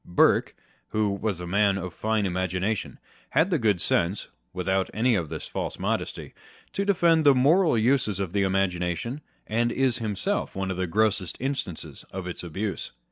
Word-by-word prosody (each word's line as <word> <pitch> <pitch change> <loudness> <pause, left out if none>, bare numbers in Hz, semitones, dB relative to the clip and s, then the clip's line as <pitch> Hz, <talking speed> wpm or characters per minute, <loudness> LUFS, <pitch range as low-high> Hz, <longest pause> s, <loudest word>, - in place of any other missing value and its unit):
Burke, 90 - +3 0.3
who 105 -1 0
was 100 -2 -2
a 90 - -5
man 100 +2 +2
of 90 -2 -5
fine 110 -1 0
imagination, 95 +3 -1 0.3
had 180 +5 +2
the 165 - +2
good 105 -6 +2
sense 85 +4 +1 0.2
(without 95 +1 0
any 120 +3 +3
of 85 -8 0
this 80 -1 -5
false - - -4
modesty) - - -3 0.4
to 200 - 0
defend 170 -5 +3
the 140 -2 +6
moral 155 +3 +4
uses 110 -4 +2
of 95 -3 -3
the 100 - +2
imagination, 95 - 0 0.2
and 120 +2 +1
is 130 -1 +1
himself 115 - -2
one 95 0 -2
of 90 - -4
the 95 -1 -1
grossest 100 -2 +1
instances 130 - -4
of 95 -1 -6
its 90 - -5
abuse. 95 +4 -4
100 Hz, 170 wpm, -26 LUFS, 90-120 Hz, 0.4 s, the